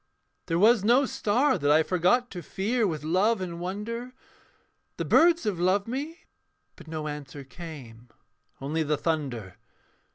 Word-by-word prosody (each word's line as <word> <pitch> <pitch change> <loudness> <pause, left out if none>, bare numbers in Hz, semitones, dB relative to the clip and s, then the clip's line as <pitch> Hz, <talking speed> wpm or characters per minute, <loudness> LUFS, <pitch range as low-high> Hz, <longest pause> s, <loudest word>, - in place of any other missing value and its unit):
'There 165 - 0
was 215 +2 +5
no 245 +6 +4
star 255 +5 +1
that 145 - +1
I 155 +2 +5
forgot 185 +9 +1
to 180 - -6
fear 215 - -1
With 155 -4 -4
love 190 +8 +2
and 175 -2 -5
wonder. 220 +7 -5 0.8
The - - -2
birds 340 +1 +4
have 200 -5 -2
loved 190 +3 +2
me'; 290 +8 -5 0.5
but - - -15
no 155 -1 -4
answer 145 -1 -7
came 130 -6 -11 0.5
Only 150 +4 -2
the 150 -1 0
thunder. 130 - -3
180 Hz, 150 wpm, -27 LUFS, 150-230 Hz, 0.8 s, was